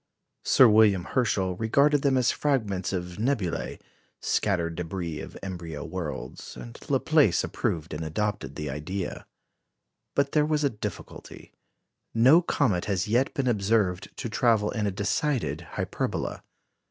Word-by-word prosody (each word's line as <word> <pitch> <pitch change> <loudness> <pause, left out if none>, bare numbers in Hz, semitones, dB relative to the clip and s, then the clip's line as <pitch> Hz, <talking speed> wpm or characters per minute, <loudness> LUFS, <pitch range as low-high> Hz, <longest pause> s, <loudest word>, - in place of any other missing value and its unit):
Sir 130 - +6
William 105 -4 +5
Herschel 95 -5 0
regarded 140 +7 +3
them 135 -2 +2
as 125 -1 +3
fragments 105 -11 -1
of 90 0 -4
nebulæ 110 -8 -1 0.4
scattered 85 -5 0
débris 85 -2 -4
of - - -9
embryo 85 -5 -6
worlds; 85 -9 -6
and - - -9
Laplace - - +3
approved 80 -1 -2
of 75 - -4
and 80 - -4
adopted 80 -6 -2
the 75 - -4
idea. 80 +7 -5 0.9
But 140 0 +2
there 150 - +3
was 150 0 +1
a 140 - +2
difficulty. 105 -4 -8 0.6
No 130 +9 +7
comet 95 - +1
has 95 -2 -1
yet 125 +7 +2
been 135 -3 0
observed 100 -4 +1
to - - -3
travel 110 -2 +2
in 105 -3 -1
a - - 0
decided 100 - -1 0.2
hyperbola. - - -2
100 Hz, 140 wpm, -27 LUFS, 85-125 Hz, 0.9 s, No